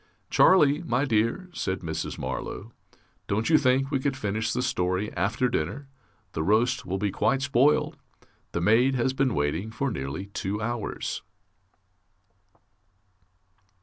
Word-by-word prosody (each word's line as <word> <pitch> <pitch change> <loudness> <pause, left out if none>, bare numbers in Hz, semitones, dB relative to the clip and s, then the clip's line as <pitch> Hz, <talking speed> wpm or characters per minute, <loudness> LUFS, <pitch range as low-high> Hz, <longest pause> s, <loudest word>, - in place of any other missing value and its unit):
"Charlie, 150 -4 +5
my 135 -4 0
dear," 115 - 0
said 95 - -2
Mrs. 80 -2 -4
Marlow, 110 +4 -5 0.6
"Don't 110 +9 0
you 155 - +7
think 135 +1 +2
we 135 - +1
could 135 0 -1
finish 105 0 -1
the 125 - -1
story 95 -3 -1
after 110 +8 +1
dinner? 120 - -3 0.4
The 80 - -3
roast 115 +8 +1
will 95 +2 -1
be 100 0 -1
quite 135 +7 +1
spoiled. 140 +1 +2 0.5
The 85 - -2
maid 120 +8 +4
has 130 +1 +1
been 130 -3 +1
waiting 75 +8 -1
for 130 +4 -2
nearly 70 +4 -4
two 100 0 -4
hours...." 115 0 -3
115 Hz, 135 wpm, -26 LUFS, 100-135 Hz, 0.6 s, you